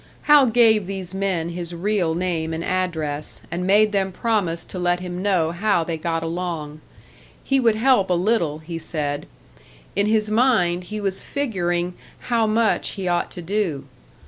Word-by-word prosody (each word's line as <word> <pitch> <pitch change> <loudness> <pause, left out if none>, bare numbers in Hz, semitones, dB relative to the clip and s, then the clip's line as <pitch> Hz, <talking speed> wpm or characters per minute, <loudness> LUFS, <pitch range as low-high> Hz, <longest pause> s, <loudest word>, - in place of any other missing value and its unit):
Hal 295 -3 +6
gave 220 -4 +4
these 190 -2 -4
men 190 -4 -1
his 175 0 -4
real 180 -2 0
name 165 -2 -1
and 165 - -4
address, 160 -6 -2
and 180 +1 -2
made 210 +2 +5
them 195 -2 0
promise 180 -6 -1
to 185 - -7
let 175 0 +1
him 180 0 -5
know 185 -5 +1
how 175 0 +1
they 165 0 -3
got 165 +1 -2
along. 165 -3 -4 0.6
He 270 0 +2
would 230 -4 +3
help 225 -4 +3
a 180 - +3
little, 175 -5 +1
he 165 +1 -7
said; 150 -3 -3 0.7
in 200 +1 +2
his 215 -1 +1
mind 185 -7 +2
he 215 +3 -5
was 195 -2 -1
figuring 180 -10 -1 0.3
how 230 -2 +1
much 220 +1 +1
he 195 -2 -4
ought 175 0 0
to 175 - -8
do. 170 -7 -1
180 Hz, 170 wpm, -22 LUFS, 170-215 Hz, 0.7 s, Hal